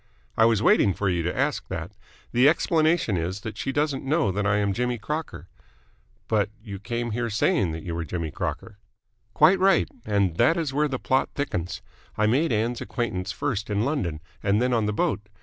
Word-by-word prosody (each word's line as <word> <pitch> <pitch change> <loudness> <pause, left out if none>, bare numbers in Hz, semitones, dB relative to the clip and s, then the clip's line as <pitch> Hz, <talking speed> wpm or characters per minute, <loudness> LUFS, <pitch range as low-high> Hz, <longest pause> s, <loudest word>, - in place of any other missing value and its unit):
"I 110 - +5
was 115 -2 +3
waiting 100 -3 +4
for 100 - 0
you 90 -2 0
to 85 +1 -3
ask - - 0
that. 85 +4 -5 0.4
The 125 +4 +5
explanation 160 - +2
is 90 +4 -3
that 110 0 -6
she 135 - -3
doesn't 145 -1 -1
know 145 - +1
that 100 +2 -1
I 100 +1 +2
am 100 -1 +1
Jimmy 125 +2 -1
Crocker." 150 +9 -5 0.8
"But 105 -3 +1
you 100 -3 -8
came 120 +2 -3
here 115 +1 -2
saying 105 -3 +1
that 80 0 -6
you 85 - -4
were 85 0 -2
Jimmy 80 -1 -4
Crocker." 110 +7 -5 0.6
"Quite 175 +5 +5
right. 195 +1 +4 0.2
And 100 -5 0
that 160 +8 +4
is 155 -5 -2
where 150 +2 +2
the 135 -2 -3
plot 130 +1 +1
thickens. 90 - -3 0.3
I 105 - +3
made 135 +9 +2
Ann's 115 +2 0
acquaintance 100 -7 -3
first 115 -6 -3
in 105 +2 0
London 90 - -2 0.2
and 100 +1 +2
then 125 +1 +1
on 110 -3 +1
the - - +1
boat. 105 0 -1
110 Hz, 200 wpm, -25 LUFS, 100-135 Hz, 0.8 s, I